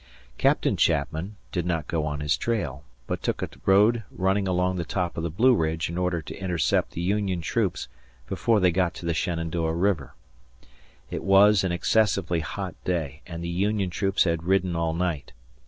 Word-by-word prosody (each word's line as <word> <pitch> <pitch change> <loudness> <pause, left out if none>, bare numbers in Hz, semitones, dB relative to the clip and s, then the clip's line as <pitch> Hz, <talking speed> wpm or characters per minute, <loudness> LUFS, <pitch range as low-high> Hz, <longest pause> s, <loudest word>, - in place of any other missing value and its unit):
Captain - - +2
Chapman 80 +8 0 0.2
did 90 - -1
not 85 -4 -1
go 80 -3 -1
on 75 -1 -3
his 75 0 +2
trail, 75 - -2 0.2
but - - -3
took - - -2
a - - -3 0.2
road 105 +4 +5
running 95 +1 0
along 90 0 +1
the 85 - -1
top 90 +1 -2
of - - -3
the 85 - -2
Blue 115 +11 +4
Ridge 80 -4 0
in - - -5
order 90 -3 -1
to 80 - -8
intercept 90 -4 0
the 85 - -4
Union 95 0 0
troops 80 - -1 0.4
before 115 - +1
they 90 -2 +4
got 90 0 0
to - - -8
the 85 - +1
Shenandoah 85 -1 -1
River. 85 -5 0 1.0
It - - -4
was 100 +1 +6
an 95 - 0
excessively 95 -1 +1
hot 85 +5 -5
day 80 -5 -2
and 85 -1 -6
the - - -3
Union 95 +1 0
troops 95 +2 +1
had 85 -3 0
ridden 95 -1 +1
all 85 -1 0
night. 85 -5 -2
90 Hz, 185 wpm, -26 LUFS, 80-95 Hz, 1.0 s, was